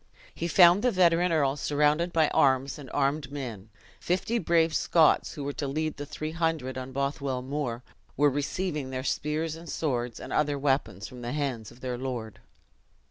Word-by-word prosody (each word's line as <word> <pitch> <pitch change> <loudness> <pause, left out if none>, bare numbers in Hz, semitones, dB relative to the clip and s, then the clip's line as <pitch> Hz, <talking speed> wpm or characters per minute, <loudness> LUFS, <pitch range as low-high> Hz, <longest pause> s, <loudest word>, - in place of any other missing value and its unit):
HE 170 - -3
found 175 +2 +6
the 250 - +3
veteran 180 -3 +3
earl 140 -4 +2
surrounded 150 +4 +1
by 160 -2 +3
arms 135 +1 +2
and 135 -3 -10
armed 140 0 0
men; 115 -8 -6 0.3
fifty 190 +6 0
brave 165 -3 +2
Scots, 160 0 +3
who 145 - -5
were 140 +1 -3
to 140 - -3
lead 155 +3 -2
the 145 - -6
three 155 +2 -5
hundred 160 -5 -1
on 130 0 -6
Bothwell 140 -1 -2
Moor, 130 -3 -3 0.3
were 145 +1 +4
receiving 145 +1 -2
their 130 0 -4
spears 155 +3 -1
and 165 +1 -11
swords, 125 -6 -2
and - - -7
other 150 -1 +1
weapons, 135 -8 -1
from 125 -1 -11
the 120 +1 -4
hands 135 -8 -2
of 125 - -17
their 125 -2 -3
lord. 120 -5 -5
145 Hz, 180 wpm, -28 LUFS, 130-160 Hz, 0.3 s, found